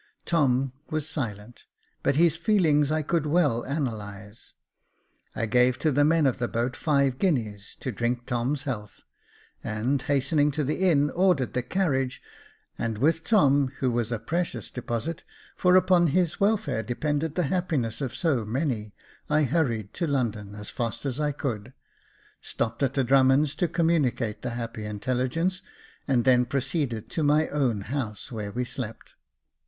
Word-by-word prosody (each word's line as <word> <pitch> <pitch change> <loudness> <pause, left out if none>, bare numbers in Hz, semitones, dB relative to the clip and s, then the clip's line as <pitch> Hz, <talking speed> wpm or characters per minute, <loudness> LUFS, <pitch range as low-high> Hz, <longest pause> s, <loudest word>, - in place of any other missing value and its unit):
Tom 135 -5 +2 0.2
was 155 -1 -2
silent, 115 -6 -5 0.4
but 135 - +1
his 165 0 +4
feelings 165 -6 +2
I 155 0 +1
could 155 0 0
well 145 -7 +2
analyse. 110 -6 -5 0.8
I 115 - -1
gave 125 +2 +3
to 155 - +1
the 145 +2 +3
men 160 +1 +3
of 130 - +1
the 120 - 0
boat 120 +3 -2
five 140 -4 +1
guineas 110 - -1
to 130 - -2
drink 120 +1 -2
Tom's 130 +3 -1
health, 105 -8 -5 0.6
and, 120 +6 -1
hastening 145 +2 +2
to 150 +1 -1
the 150 +5 -2
inn, 145 -3 +3
ordered 175 -8 +2
the 125 - 0
carriage, 135 -4 -1 0.6
and 115 -2 -2
with 160 +7 +2
Tom, 145 -10 +4
who 130 -2 0
was 120 -1 -1
a 115 - 0
precious 170 +9 -3
deposit, 125 +6 -4 0.3
for 180 0 +4
upon 180 -2 +5
his 175 +2 +1
welfare 205 - +1
depended 145 +6 -2
the 180 - +1
happiness 150 -11 -1
of 130 -2 -3
so 135 -5 +1
many, 110 -2 -2 0.3
I 150 +1 +3
hurried 120 - 0
to 170 - -2
London 110 -7 -2
as 105 0 -6
fast 115 +3 -3
as 135 0 -2
I 150 -1 +1
could, 125 -4 -4 0.7
stopped 115 +2 -3
at 135 0 +1
the 135 - +2
Drummonds 135 +3 +4
to 165 +3 0
com 165 0 +1
municate 125 -9 0
the - - -3
happy 115 -2 -5
intelligence, 130 - -1 0.5
and 125 -4 +2
then 125 -1 +5
proceeded 135 -3 -2
to 160 - -1
my 150 +1 +3
own 130 -8 0
house, 110 0 -4
where 105 -3 -4
we 125 +3 -2
slept. 115 -3 -7
135 Hz, 160 wpm, -26 LUFS, 120-155 Hz, 0.8 s, upon